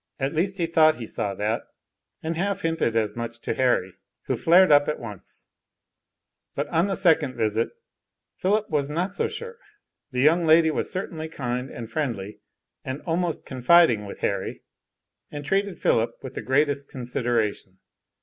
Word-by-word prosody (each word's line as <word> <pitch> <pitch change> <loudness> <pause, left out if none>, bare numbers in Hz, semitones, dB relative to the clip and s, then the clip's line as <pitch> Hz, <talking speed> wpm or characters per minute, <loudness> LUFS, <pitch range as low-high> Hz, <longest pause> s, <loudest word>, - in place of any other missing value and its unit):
At 135 +2 -1
least 190 +5 0
he 170 - +1
thought 160 -1 +4
he 120 - -7
saw 100 -2 -3
that, 105 +3 -1 0.6
and 160 +1 -2
half 195 +3 -1
hinted 165 -8 0
as 110 -2 0
much 115 0 -5
to - - -2
Harry, 120 -8 +1 0.3
who - - -1
flared 180 +1 +5
up 145 0 +6
at 150 - -1
once; 105 -5 -10 1.1
but - - -2
on 170 +5 +2
a 195 - 0
second 165 -8 +3
visit 110 +1 0 0.7
Philip 210 +3 +1
was 145 -2 -1
not 175 +5 -2
so - - 0
sure, 470 0 -8 0.5
the 125 -3 -1
young 165 +4 +4
lady 160 0 +6
was - - -2
certainly 160 -4 -4
kind 125 -3 -3
and 115 -1 -7
friendly 115 -6 -3 0.4
and 130 +2 -5
almost 170 -1 -1
confiding 130 -4 +4
with - - -9
Harry, - - -2 0.7
and 145 -1 -7
treated 195 +2 0
Philip 115 +1 +1
with 130 -1 -7
the - - -5
greatest 140 +1 +1
consideration. 120 -6 -2
145 Hz, 160 wpm, -25 LUFS, 120-170 Hz, 1.1 s, up